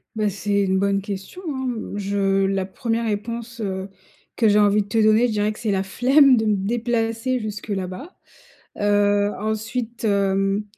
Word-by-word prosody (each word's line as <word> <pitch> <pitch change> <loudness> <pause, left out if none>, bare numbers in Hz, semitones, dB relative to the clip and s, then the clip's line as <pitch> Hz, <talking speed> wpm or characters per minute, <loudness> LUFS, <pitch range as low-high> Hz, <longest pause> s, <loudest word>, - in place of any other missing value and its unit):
Bah, 215 -1 0
c'est 200 +1 -1
une 190 0 +1
bonne 200 0 +1
question, 200 - -7
hein, 265 -3 -3
mmh. 225 -4 -4
Je 195 -1 +1
la 195 -1 0
1re 230 +4 -2
réponse, 230 +2 -4
heu, 190 -2 -3 0.5
que 225 - +3
j'ai 210 +1 +4
envie 205 0 +4
de 200 - -7
te 225 +1 +2
donner, 215 +3 +4
je - - -3
dirais 210 0 0
que - - -13
c'est 220 -3 -1
la 190 -1 0
flemme 265 +7 +5
de 220 -2 0
me 210 - +3
déplacer 230 +3 -1
jusque 215 -1 -6
là-bas, 195 - -5 0.6
heu, 205 0 +2
ensuite, 225 +2 -3
hem, 195 0 +1
210 Hz, 180 wpm, -22 LUFS, 200-230 Hz, 0.6 s, flemme